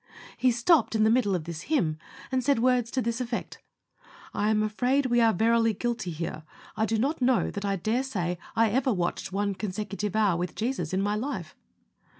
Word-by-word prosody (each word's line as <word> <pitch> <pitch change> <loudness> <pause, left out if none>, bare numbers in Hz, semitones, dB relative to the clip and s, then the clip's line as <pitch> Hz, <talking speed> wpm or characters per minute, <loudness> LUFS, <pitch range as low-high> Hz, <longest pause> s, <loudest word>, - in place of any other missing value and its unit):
He 255 - +3
stopped 240 +3 +3
in 215 - +3
the 220 - +4
middle 225 -5 +2
of 170 - -2
this 170 0 -6
hymn, 165 - +1 0.3
and 260 -1 +1
said 280 +1 +3
words 245 0 +2
to 260 0 -1
this 235 +2 -2
effect: 240 -1 -4 0.7
"I 205 +1 0
am 215 -1 +2
afraid 250 +6 +1
we 240 -1 +3
are 225 -1 +5
verily 225 +2 +2
guilty 235 -3 -2
here. 165 -1 -4 0.3
I 220 +1 0
do 225 - 0
not 275 +6 0
know 250 -1 +2
that 200 0 -5
I 200 -1 0
dare 220 +7 0
say 180 -10 -3 0.2
I 225 -2 +3
ever 260 +3 +2
watched 180 -3 -2
one 200 +1 0
consecutive 205 +1 -4
hour 205 -5 +3
with 175 -1 -3
Jesus 220 - -2
in 190 +1 0
my 205 +1 0
life." 210 - -4
220 Hz, 200 wpm, -27 LUFS, 195-245 Hz, 0.7 s, are